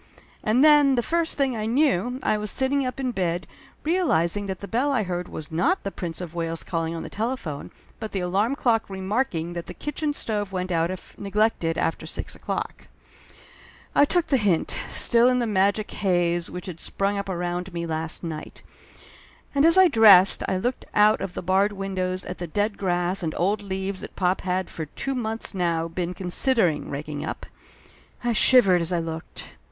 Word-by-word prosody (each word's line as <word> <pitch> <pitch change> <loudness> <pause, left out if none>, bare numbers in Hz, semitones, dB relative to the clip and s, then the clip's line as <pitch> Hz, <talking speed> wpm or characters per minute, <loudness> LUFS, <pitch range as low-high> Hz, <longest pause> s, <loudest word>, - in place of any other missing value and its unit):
And 235 +5 +3
then 295 -3 +6
the 240 - +1
first 335 +3 0
thing 270 -3 +1
I 215 -1 -2
knew, 250 - +1
I - - +2
was 210 0 -2
sitting 265 +2 +1
up 255 +1 -5
in 255 -2 -1
bed, 175 -5 -1 0.4
realizing 205 - +1
that 190 -1 -3
the 200 - -8
bell 255 +7 0
I 245 -6 +1
heard 180 -1 -4
was 155 0 -8
not 330 - +1
the 195 - -3
Prince 170 -2 -6
of 175 -2 -7
Wales 165 -1 -3
calling 165 -1 -2
on 165 - -5
the - - -6
telephone, 215 - -4 0.3
but 220 - -5
the 195 - -2
alarm 200 +8 +1
clock 235 -7 +1
remarking 190 -3 -2
that 170 -1 -6
the - - -8
kitchen 295 0 -2
stove 210 -7 -3
went 185 -1 -3
out 165 0 +1
if 185 0 -8
neglected 200 -5 0
after 165 - -1
six - - -6
o'clock. - - -5 1.1
I - - +5
took 350 +3 +1
the 270 - +2
hint, 200 -8 +1
still 235 +1 +4
in 250 - +2
the 245 - +1
magic 205 0 +1
haze 175 -3 0
which 180 0 -7
had 175 -3 -7
sprung 200 +1 -1
up 200 - -5
around 175 +1 -3
me 170 -1 -4
last 160 +1 -2
night. 160 -2 -7 0.9
And 280 +1 +3
as 335 +2 +6
I 375 -1 +8
dressed 210 - +7
I 190 - 0
looked 245 +7 -2
out 210 0 +5
of 190 -3 -5
the - - -4
barred 190 +3 +2
window 190 -2 -2
at 180 - -7
the 175 - -4
dead 205 +5 -1
grass 180 0 -1
and 160 -3 -3
old 205 +4 +1
leaves 190 -1 -4
that - - -9
pop 185 0 +1
had 185 -1 -2
for 160 -2 -5
two 270 - -4
months 225 -4 -3
now 170 -3 0
been 175 +1 -4
con 180 -2 -5
sidering 185 - +2
raking 145 +1 -5
up. - - -5 0.8
I 240 -1 +1
shivered 215 -6 +5
as 170 +1 -2
I 175 - +1
looked. 165 -1 -6
195 Hz, 195 wpm, -24 LUFS, 175-235 Hz, 1.1 s, I